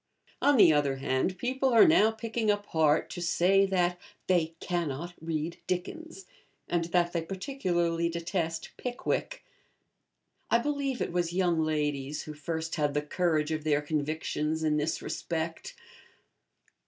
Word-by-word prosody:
On 285 -1 +4
the 165 -7 +7
other 145 -2 +2
hand, 135 +7 -1
people 260 +2 0
are 230 -3 +7
now 315 -10 +5
picking 225 0 -2
up 205 0 +1
heart 155 -4 +2
to 175 - -5
say 190 +3 +3
that 180 -2 +1 0.3
'they 165 -3 +1
cannot 170 -1 -3
read 160 0 -3
Dickens,' 325 - -4 0.4
and 170 -1 0
that 175 0 +1
they 170 - 0
particularly 175 -4 -1
detest 165 -1 -3
'Pickwick.' 255 - -3 1.0
I - - +5
believe 275 0 -1
it - - -4
was 175 -1 0
young 175 -3 +2
ladies 150 -2 -1
who 155 - -7
first 160 +2 -4
had 145 -1 0
the 150 - +1
courage 155 -1 0
of 155 -1 -2
their 150 -1 +1
convictions 155 +1 -2
in 155 -1 +2
this 150 +2 -1
respect. 165 -1 -4
170 Hz, 140 wpm, -29 LUFS, 155-195 Hz, 1.0 s, the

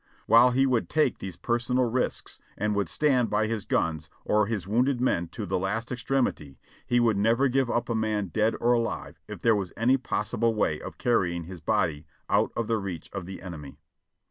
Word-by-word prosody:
While 120 +2 +7
he 130 +2 +3
would 125 -4 +1
take 155 -4 +1
these 95 -3 -6
personal 125 +2 0
risks 120 +2 -2 0.2
and 105 +1 0
would 100 -4 -1
stand 130 - +2
by 105 +1 +1
his 110 -2 -3
guns 80 -2 -1 0.2
or 105 -1 +2
his 100 -5 -3
wounded 125 +5 +2
men 85 -9 +1
to 105 +5 -6
the 95 0 -1
last 110 +6 -2
extremity, 120 - -1 0.3
he 120 - +3
would 115 -4 +3
never 115 +6 +3
give 130 -1 +1
up 120 - 0
a 120 - -1
man 110 -3 -1
dead 110 +4 +1
or 120 +1 +3
alive 115 -1 -2
if - - -8
there 115 -1 +5
was 95 -4 -3
any 125 +5 +3
possible 115 -2 -1
way 80 -7 0
of - - -8
carrying 90 -8 +1
his 90 0 -10
body 75 -1 0 0.2
out - - +3
of 115 - -1
the 115 0 0
reach 95 -5 -6
of 95 -3 -5
the 95 -1 -8
enemy. 75 -7 -8
110 Hz, 200 wpm, -27 LUFS, 95-120 Hz, 0.3 s, While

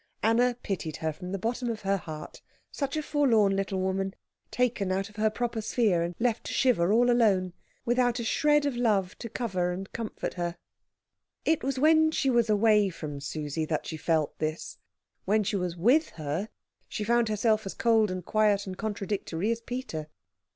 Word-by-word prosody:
Anna 240 +2 +3
pitied 165 -6 -3
her 160 -1 -2
from 180 +4 -8
the 195 - -1
bottom 235 +5 -2
of 225 -2 -4
her 195 0 +1
heart; 155 -4 -8 0.3
such 280 +1 -3
a 310 - -1
forlorn 230 -10 +3
little 195 -1 -1
woman, 190 +1 -1 0.3
taken 235 -6 0
out 195 +2 -1
of 205 - -19
her 215 0 +3
proper 230 0 -2
sphere, 215 -5 +1
and 170 +1 -3
left 235 -1 0
to - - -4
shiver 200 -9 +3
all 245 +3 +4
alone, 195 -7 +3 0.3
without 245 0 +2
a - - -2
shred 295 +5 +3
of 280 -3 -1
love 210 -6 +1
to 230 - -6
cover 185 -7 -1
and 190 +2 -6
comfort 230 -2 -4
her. 175 -1 -3 0.9
It 320 -1 +2
was 270 0 -1
when 315 +3 +5
she 275 -4 +1
was 235 -2 +2
away 210 -1 +4
from 150 -5 -6
Susie 150 +2 -3
that 155 -1 -2
she 160 - -5
felt 155 -1 0
this. 155 +1 -4 0.5
When 215 +2 +2
she 205 - -1
was 180 -2 -2
with 255 - +3
her, 155 +7 -3 0.4
she 210 - -3
found 235 +1 +2
herself 215 0 +1
as - - -6
cold 225 -2 +3
and 185 -1 -5
quiet 210 -2 +2
and 190 -1 -6
contradictory 205 -2 -2
as 230 0 -2
Peter. 235 -11 -5
210 Hz, 185 wpm, -28 LUFS, 180-240 Hz, 0.9 s, when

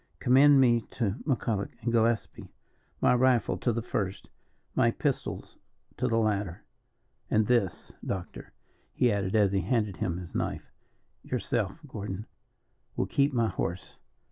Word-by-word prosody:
Commend 135 +3 +6
me 120 -3 +4
to 105 -3 -2
McCulloch 115 -6 0
and 115 +1 -1
Gillespie. 115 -1 0 0.5
My - - +5
rifle 125 -2 +3
to 120 - +1
the 115 0 -2
first, 100 -4 -3 0.4
my - - +3
pistols - - -3 0.4
to 125 - 0
the 115 -2 +1
latter, 105 -5 -1 0.7
and 110 0 +3
this, 115 -6 0
doctor," 95 -3 -5 0.4
he 125 - +3
added, 100 -1 -1
as 105 -3 +4
he 95 -1 +1
handed 105 0 0
him 85 -2 -2
his 90 -2 -8
knife. - - -3 0.5
"Yourself, 120 -4 -2
Gordon, 105 -4 -5 0.7
will - - 0
keep 140 +1 +2
my 115 -4 +1
horse. 90 +1 -4
110 Hz, 140 wpm, -29 LUFS, 100-120 Hz, 0.7 s, Commend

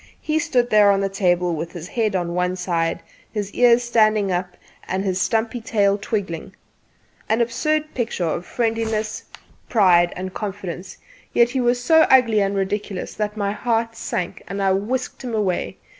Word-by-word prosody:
He 310 0 0
stood 255 -7 +1
there 210 -1 +6
on 200 -1 +3
the 195 - 0
table 180 -3 +1
with 165 +1 -5
his 175 +1 -8
head 220 -4 0
on 175 -2 -1
one 180 +1 0
side, 170 -2 -1 0.3
one 210 -2 -1
ear 240 -1 +5
standing 215 -4 +2
up, 180 0 -3 0.3
and 190 +1 -1
his 185 -1 0
stumpy 225 +3 0
tail 200 -3 +2
twiggling 195 -3 -4 0.7
an 220 +2 +2
absurd 305 +6 0
picture 225 -7 -2
of 165 +1 -2
friendliness, 225 -1 -2 0.4
pride 180 -6 +4
and 185 0 -5
confidence; 190 -3 -6 0.4
yet 235 0 +4
he 260 0 0
was 245 0 +2
so 320 +4 +5
ugly 235 -5 +5
and 200 0 0
ridiculous 195 0 -3
that 210 0 -3
my 200 -1 0
heart 230 +1 -1
sank, 185 -5 -4
and 195 +2 -5
I 195 -1 +2
whisked 245 +8 -2
him 240 -3 -3
away. 195 -4 -1
210 Hz, 170 wpm, -22 LUFS, 185-235 Hz, 0.7 s, there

